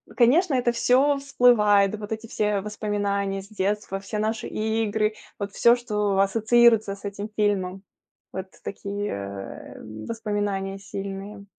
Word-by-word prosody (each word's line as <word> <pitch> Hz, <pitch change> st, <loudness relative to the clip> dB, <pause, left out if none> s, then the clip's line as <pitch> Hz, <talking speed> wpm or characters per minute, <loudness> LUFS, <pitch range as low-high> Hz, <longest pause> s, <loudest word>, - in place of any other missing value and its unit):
конечно, 275 Hz, +7 st, +4 dB
это 245 Hz, -1 st, +2 dB
всё 265 Hz, +4 st, +3 dB
всплывает. 215 Hz, -7 st, +4 dB
Вот 210 Hz, 0 st, -7 dB
эти 220 Hz, +1 st, -4 dB
все 210 Hz, -2 st, 0 dB
воспоминания 200 Hz, -1 st, -2 dB
с 195 Hz, -, -14 dB
детства, 205 Hz, -1 st, -2 dB
всё 200 Hz, +2 st, -5 dB
наши 220 Hz, +1 st, -1 dB
игры, 220 Hz, -1 st, 0 dB, 0.3 s
вот 200 Hz, 0 st, -3 dB
всё, 235 Hz, +3 st, +5 dB
что 210 Hz, -5 st, -1 dB
ассоциируется 220 Hz, +1 st, +4 dB
с 200 Hz, -, -18 dB
этим 200 Hz, +1 st, -5 dB
фильмом. 195 Hz, -2 st, 0 dB, 0.5 s
Вот 190 Hz, 0 st, -5 dB, 0.2 s
такие, 205 Hz, +1 st, -4 dB
э, 100 Hz, 0 st, -7 dB, 0.3 s
воспоминания 205 Hz, -3 st, -2 dB
сильные. 195 Hz, +1 st, -7 dB
210 Hz, 130 wpm, -25 LUFS, 200-225 Hz, 0.5 s, всё